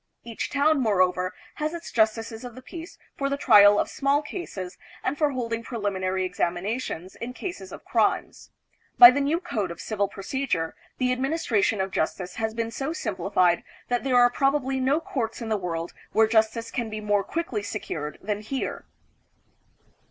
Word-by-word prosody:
Each 230 Hz, -1 st, -4 dB
town, 290 Hz, +1 st, +3 dB
moreover, 185 Hz, -5 st, +2 dB, 0.3 s
has 310 Hz, +2 st, -1 dB
its 340 Hz, -, -8 dB
justices 225 Hz, 0 st, 0 dB
of 245 Hz, -2 st, -8 dB
the 255 Hz, -, -11 dB
peace 335 Hz, +4 st, -9 dB, 0.2 s
for 275 Hz, 0 st, -1 dB
the 280 Hz, -, -1 dB
trial 205 Hz, -6 st, +7 dB
of -, -, +1 dB
small 280 Hz, +2 st, +1 dB
cases 195 Hz, -, -6 dB, 0.2 s
and 260 Hz, -, 0 dB
for 300 Hz, 0 st, +2 dB
holding 230 Hz, -4 st, -2 dB
preliminary 190 Hz, -5 st, -2 dB
examinations 180 Hz, +1 st, -3 dB
in. 245 Hz, +2 st, -5 dB
cases 375 Hz, +5 st, -6 dB
of -, -, -10 dB
crimes. -, -, 0 dB, 0.5 s
By 240 Hz, 0 st, +12 dB
the 285 Hz, +2 st, 0 dB
new 300 Hz, +4 st, +1 dB
Code 225 Hz, -, -2 dB
of 170 Hz, -1 st, -8 dB
Civil 200 Hz, +3 st, -1 dB
Procedure, 195 Hz, -4 st, -2 dB, 0.2 s
the 250 Hz, -1 st, +1 dB
administration 255 Hz, -6 st, +1 dB
of 190 Hz, 0 st, -1 dB
justice 180 Hz, +3 st, -2 dB
has 220 Hz, 0 st, -2 dB
been 230 Hz, 0 st, -2 dB
so 275 Hz, +6 st, -3 dB
simplified 185 Hz, -, +1 dB, 0.3 s
that 245 Hz, 0 st, 0 dB
there 260 Hz, -2 st, +2 dB
are 245 Hz, 0 st, +6 dB
probably 270 Hz, 0 st, +1 dB
no 270 Hz, +4 st, +2 dB
courts 230 Hz, -8 st, -3 dB
in 230 Hz, -2 st, -5 dB
the 220 Hz, -, +2 dB
world 170 Hz, -3 st, -3 dB, 0.2 s
where 220 Hz, -, +5 dB
justice 225 Hz, +1 st, +1 dB
can 235 Hz, -3 st, -2 dB
be 215 Hz, 0 st, -5 dB
more 205 Hz, -1 st, +1 dB
quickly 325 Hz, -9 st, -3 dB
secured 155 Hz, -8 st, -5 dB
than 210 Hz, +1 st, -2 dB
here. 260 Hz, +5 st, -4 dB
225 Hz, 170 wpm, -26 LUFS, 195-270 Hz, 0.5 s, By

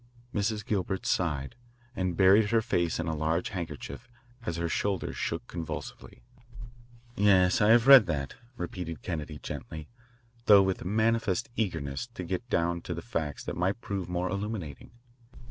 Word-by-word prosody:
Mrs. 105 Hz, 0 st, -1 dB
Gilbert 95 Hz, -2 st, -2 dB
sighed, 75 Hz, -6 st, 0 dB, 0.4 s
and 90 Hz, -4 st, -1 dB
buried 100 Hz, +3 st, +6 dB
her 115 Hz, 0 st, +2 dB
face 85 Hz, -9 st, 0 dB
in 85 Hz, -, -2 dB
a 80 Hz, -, -1 dB
lace 80 Hz, +3 st, 0 dB
handkerchief 85 Hz, -, -6 dB, 0.4 s
as 85 Hz, -, -2 dB
her 85 Hz, 0 st, -1 dB
shoulders 95 Hz, +2 st, -1 dB
shook 85 Hz, +8 st, -3 dB
convulsively. 85 Hz, -2 st, -7 dB, 0.9 s
"Yes, 95 Hz, -2 st, +4 dB
I 105 Hz, -, +5 dB
have 115 Hz, +1 st, +6 dB
read 135 Hz, -6 st, +9 dB
that," 70 Hz, -5 st, -2 dB, 0.2 s
repeated 85 Hz, -2 st, -5 dB
Kennedy 80 Hz, -3 st, -4 dB
gently, 80 Hz, +1 st, -7 dB, 0.6 s
though 100 Hz, -2 st, +8 dB
with 95 Hz, -1 st, -1 dB
manifest 110 Hz, +2 st, +1 dB
eagerness 80 Hz, -, -2 dB
to 90 Hz, -, -5 dB
get 95 Hz, +8 st, -4 dB
down 85 Hz, -2 st, 0 dB
to 85 Hz, -1 st, -2 dB
facts 80 Hz, -7 st, -4 dB
that -, -, -4 dB
might 95 Hz, +6 st, 0 dB
prove 95 Hz, -5 st, -4 dB
more 90 Hz, +1 st, -1 dB
illuminating. 100 Hz, -, -5 dB
90 Hz, 145 wpm, -29 LUFS, 80-105 Hz, 0.9 s, read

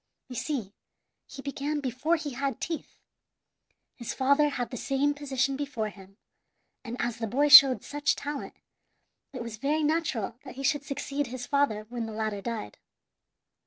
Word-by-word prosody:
You 250 Hz, -, -7 dB
see, 235 Hz, -9 st, -3 dB, 0.5 s
he 270 Hz, -, -10 dB
began 285 Hz, +2 st, -2 dB
before 275 Hz, +5 st, 0 dB
he 305 Hz, -3 st, -4 dB
had 275 Hz, +2 st, -2 dB
teeth. 330 Hz, -2 st, -5 dB, 1.0 s
His 235 Hz, -, -5 dB
father 280 Hz, +3 st, +4 dB
had 250 Hz, -4 st, -3 dB
the -, -, -4 dB
same 275 Hz, +4 st, +1 dB
position 275 Hz, -1 st, -1 dB
before 270 Hz, -6 st, -3 dB
him, 195 Hz, -1 st, -15 dB, 0.7 s
and 240 Hz, -1 st, -6 dB
as 240 Hz, -1 st, -1 dB
the 225 Hz, -, -2 dB
boy 285 Hz, +7 st, +2 dB
showed 275 Hz, -3 st, +10 dB
such 290 Hz, +1 st, 0 dB
talent, 290 Hz, 0 st, -5 dB, 0.8 s
it 255 Hz, -3 st, -5 dB
was 230 Hz, -2 st, -7 dB
very 295 Hz, +6 st, 0 dB
natural 295 Hz, -8 st, -1 dB
that -, -, -10 dB
he 275 Hz, -, -6 dB
should 290 Hz, +1 st, +1 dB
succeed 280 Hz, 0 st, -3 dB
his 245 Hz, 0 st, -6 dB
father 280 Hz, -7 st, +1 dB
when 235 Hz, -2 st, -4 dB
the 220 Hz, -, -7 dB
latter 215 Hz, -2 st, -2 dB
died. 230 Hz, +1 st, -5 dB
270 Hz, 160 wpm, -28 LUFS, 235-290 Hz, 1.0 s, showed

